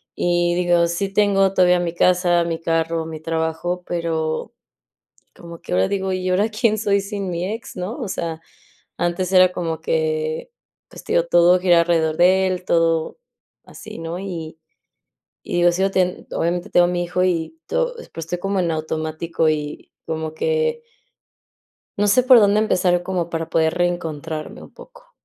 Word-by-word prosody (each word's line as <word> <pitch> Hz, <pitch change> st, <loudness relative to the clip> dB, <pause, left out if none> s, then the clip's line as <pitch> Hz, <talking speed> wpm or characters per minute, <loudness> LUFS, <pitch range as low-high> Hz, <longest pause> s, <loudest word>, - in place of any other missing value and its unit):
y 175 Hz, 0 st, +1 dB
digo: 175 Hz, -1 st, +2 dB
"Sí 180 Hz, +3 st, -2 dB
tengo 195 Hz, -2 st, +3 dB
todavía 180 Hz, -1 st, +4 dB
mi 170 Hz, -1 st, -2 dB
casa, 175 Hz, -1 st, +3 dB
mi 165 Hz, -1 st, -3 dB
carro, 165 Hz, 0 st, -1 dB
mi 160 Hz, -1 st, -7 dB
trabajo", 165 Hz, +2 st, -2 dB
pero, 165 Hz, +2 st, -2 dB, 0.8 s
como 170 Hz, -2 st, -11 dB
que -, -, -8 dB
ahora 95 Hz, +1 st, +3 dB
digo: 190 Hz, -1 st, -2 dB
"¿Y 185 Hz, 0 st, -2 dB
ahora 200 Hz, +4 st, +2 dB
quién 215 Hz, 0 st, +1 dB
soy 200 Hz, -1 st, +1 dB
sin 200 Hz, -2 st, -5 dB
mi 170 Hz, +1 st, -3 dB
ex", 225 Hz, -3 st, -8 dB
¿no? 185 Hz, +9 st, -5 dB
O 225 Hz, -, -4 dB
sea, 165 Hz, -3 st, -4 dB, 0.6 s
antes 175 Hz, +2 st, -1 dB
era 185 Hz, -1 st, +6 dB
como 165 Hz, -3 st, -3 dB
que, 155 Hz, -, -1 dB, 0.4 s
pues, -, -, -13 dB
te -, -, -4 dB
digo, 170 Hz, -, +3 dB
todo 175 Hz, +1 st, +5 dB
giraba 175 Hz, -2 st, +4 dB
alrededor 160 Hz, -2 st, +1 dB
de 190 Hz, +2 st, +4 dB
él, 185 Hz, -1 st, -3 dB
todo 165 Hz, -, +1 dB, 0.5 s
así, -, -, -11 dB
¿no?, 165 Hz, +2 st, -5 dB
y 165 Hz, -5 st, -6 dB, 0.9 s
y -, -, -4 dB
digo 175 Hz, 0 st, +4 dB
sigo 190 Hz, +3 st, +1 dB
ten 180 Hz, -1 st, -1 dB
obviamente, 175 Hz, +1 st, -2 dB
tengo 175 Hz, 0 st, +4 dB
a -, -, +1 dB
mi 175 Hz, 0 st, -1 dB
hijo 180 Hz, +1 st, -1 dB
y 180 Hz, -, -1 dB
to -, -, -1 dB
y 485 Hz, -, -11 dB
pues, 165 Hz, -1 st, -7 dB
estoy 175 Hz, +1 st, -3 dB
como 195 Hz, 0 st, -1 dB
en 170 Hz, -2 st, 0 dB
automático, 160 Hz, +1 st, -2 dB
y 150 Hz, -1 st, -4 dB, 0.2 s
como 160 Hz, -1 st, -4 dB
que 470 Hz, 0 st, -1 dB, 1.1 s
no 205 Hz, 0 st, +2 dB
sé 250 Hz, +5 st, +4 dB
por 255 Hz, -2 st, +7 dB
dónde 205 Hz, 0 st, +4 dB
empezar 180 Hz, -4 st, +1 dB
como 175 Hz, -2 st, -2 dB
para 165 Hz, -1 st, -4 dB
poder 160 Hz, -1 st, +2 dB
reencontrarme 165 Hz, -3 st, -3 dB
un -, -, -14 dB
poco. -, -, -16 dB
175 Hz, 175 wpm, -21 LUFS, 165-190 Hz, 1.1 s, por